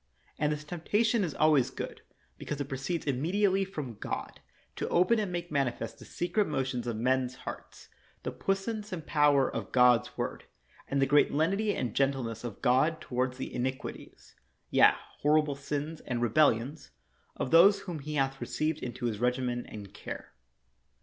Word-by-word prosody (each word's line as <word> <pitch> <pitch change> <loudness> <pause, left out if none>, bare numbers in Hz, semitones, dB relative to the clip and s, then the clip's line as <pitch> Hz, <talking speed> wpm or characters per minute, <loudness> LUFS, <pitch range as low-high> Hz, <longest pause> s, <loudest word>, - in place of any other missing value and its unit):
And 150 0 +2
this 150 0 -3
temptation 205 +8 +1
is 165 -6 -3
always 150 -5 +4
good - - -6 0.4
be - - -8
cause 150 - -3
it 140 - -2
proceeds 140 +5 -3
immediately 185 +8 +2
from 145 - -6
God, - - -5 0.4
to - - -2
open 185 +7 +4
and 205 -4 -2
make 175 -1 -4
manifest 125 -6 -1
the - - -11
secret 200 +4 0
motions 130 -4 -2
of 120 - -1
men's 130 +2 +1
hearts, - - -8 0.4
the - - -2
puissance 210 +2 -2
and 165 -4 -5
power 145 -3 +4
of - - -5
God's 125 -2 +4
word - - -3 0.4
and 140 - 0
the - - +5
great 145 +2 +4
lenity 195 +8 +1
and 120 -4 -2
gentleness 135 -5 0
of 120 -4 -7
God 145 +6 +3
toward 125 0 -1
the 130 - -6
iniquities 130 +1 -5 0.4
(yea, - - +7 0.3
horrible 150 0 +3
sins 145 +3 -4
and 120 -2 -1
re 120 -1 +1
bellions) 140 +2 +2 0.5
of - - -3
those 185 +5 +7
whom 175 -5 -5
he 150 +2 -5
hath 135 -1 0
received 155 0 -1
into 120 0 -5
his 110 -3 -1
regimen 125 0 0
and 100 -2 -9
care. - - -8
145 Hz, 170 wpm, -30 LUFS, 125-165 Hz, 0.5 s, yea